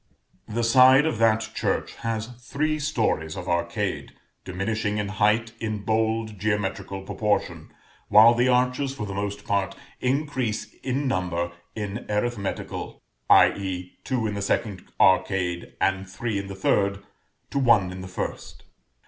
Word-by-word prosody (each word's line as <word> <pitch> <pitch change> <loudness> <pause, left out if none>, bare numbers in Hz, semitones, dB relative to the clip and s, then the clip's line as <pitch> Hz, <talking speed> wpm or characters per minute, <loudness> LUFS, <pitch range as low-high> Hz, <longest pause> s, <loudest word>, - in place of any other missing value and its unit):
The 115 +2 -2
side 130 +4 +7
of 120 -8 -1
that 110 -1 +2
church - - -1
has 115 -1 -2
three 155 +5 -1
stories 110 - -1
of 90 0 -6
arcade, 85 +3 -2 0.3
diminishing 105 +3 -2
in 105 -1 -2
height 105 +3 +2
in 110 -2 -3
bold 110 -1 0
geometrical 100 -2 -2
proportion, 95 -5 -2 0.4
while 110 +3 +8
the 120 +2 +2
arches, 125 +2 +1
for 105 - -4
the 100 - -5
most 100 +1 -4
part, 100 -2 0 0.2
increase 130 -6 -1
in 135 +2 -1
number 90 -5 -1 0.2
in 105 -2 -5
arithmetical, 105 -1 -3 0.3
i.e. 90 -2 +3
two 125 -4 -1
in 105 - -1
the 100 - -3
second 100 -1 -2
arcade, 95 -2 +2
and 95 0 0
three 100 +1 -3
in 100 - -6
the 95 - -7
third, 100 +1 +1 0.5
to 140 - 0
one 115 -8 +4
in 90 0 -7
the 95 - -7
first. 90 - -6
105 Hz, 140 wpm, -25 LUFS, 95-115 Hz, 0.5 s, while